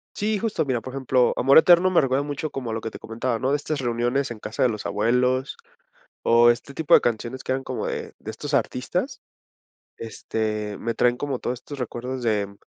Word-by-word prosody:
Sí, 210 0 0
justo, 215 -8 -1
mira, 125 -4 -1
por 130 - -8
ejemplo, 130 -2 +2
Amor 135 +4 +5
Eterno 175 +2 +7
me 180 - +4
recuerda 135 +1 +1
mucho 145 +1 -4
como 125 -4 -5
a - - -3
lo 110 - -3
que 115 - -5
te - - -10
comentaba, 115 +1 -3
¿no?, 130 +2 0
de - - +3
estas 145 0 -3
reuniones 120 +2 0
en 115 -2 -7
casa 110 - -5
de 130 - +6
los 105 -2 -5
abuelos, 125 +6 +1 0.7
o 120 +1 +6
este 125 +4 -3
tipo 160 -3 -2
de - - +9
canciones 120 +2 -2
que - - -2
eran 135 0 -2
como - - -3
de - - -4
de 110 - -7
estos 145 +6 -6
artistas, 125 -2 -1 0.8
este, 110 -1 -3
me 115 0 -3
traen 120 +2 +2
como 135 -1 -3
todos 125 0 -3
estos 145 -2 -9
recuerdos 125 +1 -4
de, 105 -3 +1
mm 100 0 -16
125 Hz, 215 wpm, -24 LUFS, 115-135 Hz, 0.8 s, de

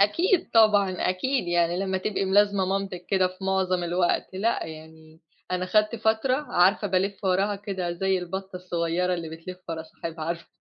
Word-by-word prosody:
أكيد 335 - +2
طبعًا، 210 -3 +5
أكيد، 185 +3 0
يعني 175 0 +2
لمّا 190 -1 -1
تبقي 195 0 -1
ملازمة 200 0 +3
مامتِك 190 -2 -3
كده 190 -2 +3
في 185 +1 -11
معظم 185 -2 +1
الوقت، 175 +2 0
لأ 220 +2 0
يعني، 160 0 -12 0.3
أنا 185 0 -1
خدت 215 +4 +2
فترة 220 +4 +1 0.2
عارفة 190 +4 +3
بالِفّ 195 +2 -1
وراها 195 +2 +1
كده 190 -4 -4
زي 190 +1 0
البطة 190 +1 -6
الصغيّرة 180 0 -1
اللي 165 -2 -5
بتلف 165 +3 -9
ورا 160 -1 -4
صاحبها، 160 0 -7
عارفة 170 0 -4
185 Hz, 165 wpm, -26 LUFS, 175-200 Hz, 0.3 s, طبعًا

